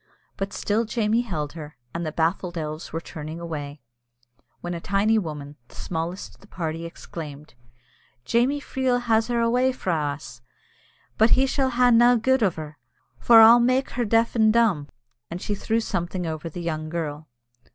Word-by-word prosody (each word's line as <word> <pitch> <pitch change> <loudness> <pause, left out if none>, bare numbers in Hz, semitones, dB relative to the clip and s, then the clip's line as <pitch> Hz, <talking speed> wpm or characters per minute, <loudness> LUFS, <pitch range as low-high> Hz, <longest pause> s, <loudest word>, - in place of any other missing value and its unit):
But 195 +1 -4
still 215 +3 0
Jamie 220 0 0
held 155 -11 -4
her, 150 -2 -9 0.2
and 170 - -3
the 155 - -3
baffled 170 +2 -1
elves 155 0 -5
were 165 - -3
turning 160 0 -8
away, 150 -4 -6 0.8
when 175 0 -4
a 170 - -4
tiny 205 +4 +2
woman, 150 -5 -7
the - - -18
smallest 170 +2 -5
of - - -23
the 200 - -17
party, 165 -3 -4
exclaimed, 150 -4 -9 0.7
"Jamie 250 +5 +2
Freel 260 -3 -1
has 225 -2 +2
her 240 -1 0
awa' 245 +3 +2
frae 190 -8 -2 0.2
us, 120 -5 -12 0.8
but 220 +3 +5
he 265 - +4
sall 265 0 0
hae 250 0 +3
nae 240 +1 +6
gude 260 +3 +2
o' 205 - +4
her, 155 -4 -9 0.4
for 230 -1 +7
I'll 230 +2 +9
mak' 255 +3 +1
her 245 - -1
deaf 225 +2 +2
and 220 -2 +4
dumb," 215 -11 +2 0.4
and 170 - -5
she 205 - -3
threw 220 +3 -1
something 180 -4 -3
over 160 0 -4
the 175 +2 -7
young 155 -2 -3
girl. 155 -2 -4
190 Hz, 175 wpm, -24 LUFS, 160-230 Hz, 0.8 s, I'll